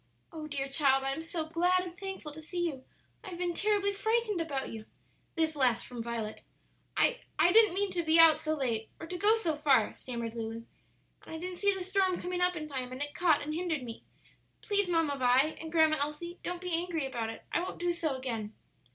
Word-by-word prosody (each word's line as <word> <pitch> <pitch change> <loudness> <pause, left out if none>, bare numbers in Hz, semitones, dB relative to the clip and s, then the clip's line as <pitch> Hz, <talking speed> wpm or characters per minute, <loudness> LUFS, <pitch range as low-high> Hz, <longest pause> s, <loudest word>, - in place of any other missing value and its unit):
"Oh, 310 -2 -7
dear 275 -2 -3
child, 270 -1 +3
I 270 - 0
am 320 - -4
so 325 0 -4
glad 355 +3 +2
and 350 -1 -8
thankful 385 -5 -6
to 310 +2 -10
see 345 +3 -3
you; 270 -6 -4 0.4
I 410 - -7
have 350 - -7
been 350 -1 -1
terribly 405 +1 +1
frightened 440 -2 0
about 280 -5 -3
you!" 220 -1 -8 0.5
This 320 -1 +1
last 250 -5 +2
from 245 -2 -7
Violet. 225 -2 -4 0.6
"I - - +3 0.2
I 340 +3 +5
didn't 430 -3 +6
mean 400 0 0
to 355 -2 0
be 320 0 +4
out 325 -2 +8
so 310 0 -1
late 230 -6 -1
or - - -6
to 355 +2 -6
go 415 +5 +5
so 345 -9 -1
far," 295 -2 +3
stammered 235 -3 -5
Lulu. 230 0 -5 0.6
"And 320 - -7
I - - -4
didn't 360 +2 -6
see 405 0 +4
the 380 - -4
storm 380 -1 +1
coming 360 0 -3
up 360 0 +2
in 305 -2 -5
time, 260 -3 -4
and 255 - -6
it 290 0 -6
caught 320 -2 +3
and 305 +1 -4
hindered 325 -4 -2
me. 230 -2 -8 0.6
Please, 405 -3 +1
Mamma 325 -4 +1
Vi, 250 0 +4 0.2
and 320 -1 -7
Grandma 315 -2 +4
Elsie, 300 +5 -4
don't 355 0 -4
be 360 -1 -4
angry 335 -3 -1
about 240 -4 -3
it. 225 - -8
I - - +1
won't 370 - -5
do 350 0 0
so 330 -5 -1
again." 230 -5 -4
320 Hz, 225 wpm, -31 LUFS, 270-360 Hz, 0.6 s, out